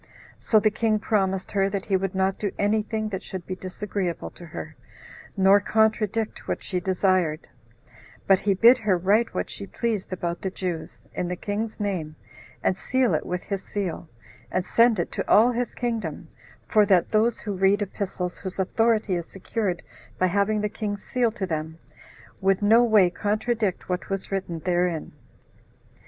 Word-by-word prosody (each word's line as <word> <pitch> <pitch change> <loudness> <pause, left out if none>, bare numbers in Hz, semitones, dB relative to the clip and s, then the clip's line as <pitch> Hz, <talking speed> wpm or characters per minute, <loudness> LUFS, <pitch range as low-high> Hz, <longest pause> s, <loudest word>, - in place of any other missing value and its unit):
So 215 - +4
the 215 0 +2
king 215 0 +1
promised 195 -3 0
her 195 -1 +2
that 200 -1 -3
he 195 - +1
would 190 0 -1
not 190 0 +1
do 205 -2 -1
any 210 +2 +2
thing 215 0 -3
that 190 -2 -4
should 185 -4 -7
be 185 - -4
disagreeable 185 -1 -4
to 175 - -12
her, - - -8 0.6
nor 195 +1 +6
contradict 220 0 0
what - - -2
she 185 - -2
desired; 185 -3 +1 0.8
but 195 -1 +5
he 200 -2 +1
bid 235 +6 +7
her 205 -4 +2
write 205 +6 +2
what - - -1
she 200 - -7
pleased 220 -4 -2
about 175 -2 -3
the 190 - -1
Jews, 180 -4 -5
in 180 - -2
the 180 - -2
king's 215 +4 -4
name, 180 -7 -2 0.5
and - - +2
seal 250 0 +1
it 155 - -1
with 180 0 -3
his 195 -2 -4
seal, 180 -5 -4 0.4
and 185 0 0
send 230 -1 +4
it 175 - -2
to - - -4
all 230 +4 +6
his 245 0 -2
kingdom, 205 -10 -3 0.4
for 215 - +5
that 185 -4 +3
those 225 +2 +2
who 210 - -3
read 195 +2 +3
epistles 185 -2 -4
whose 190 -2 -6
authority 215 +1 +1
is 170 -2 -2
secured 195 -1 -3 0.3
by 185 - +2
having 200 +3 +1
the 210 - +1
king's 205 -1 -4
seal 245 -3 +1
to 210 -4 -3
them, 160 -2 -4 0.6
would 195 +1 +2
no 225 +4 +6
way 210 -6 +5
contradict 215 0 -1
what 180 -1 -3
was 195 0 -3
written 180 -4 -3
therein. 175 -2 0
195 Hz, 175 wpm, -25 LUFS, 185-215 Hz, 0.8 s, bid